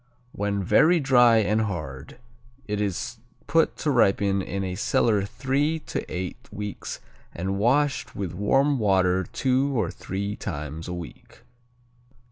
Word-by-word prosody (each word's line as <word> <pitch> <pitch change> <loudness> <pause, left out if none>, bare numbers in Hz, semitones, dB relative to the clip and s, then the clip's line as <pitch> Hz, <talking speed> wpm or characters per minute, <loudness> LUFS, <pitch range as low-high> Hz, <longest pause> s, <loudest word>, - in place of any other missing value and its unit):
When 100 -1 -2
very 170 - +5
dry 125 -5 +5
and 110 0 +2
hard, 75 - -5 0.5
it 105 0 -2
is 110 +5 -3 0.3
put 165 0 +2
to 150 - 0
ripen 100 -5 +3
in 100 +1 -3
a 95 -1 -3
cellar 105 +1 +2
three 135 +7 0
to - - -4
eight 90 0 -5
weeks 105 -1 -6 0.4
and 95 +3 -2
washed 135 +5 +1
with 95 -4 -4
warm 135 +9 +2
water 95 -3 +2
two 130 0 +1
or 90 -5 0
three 100 +2 -4
times 75 +2 -6
a 90 - -4
week. 85 -2 -11
105 Hz, 135 wpm, -25 LUFS, 95-125 Hz, 0.5 s, very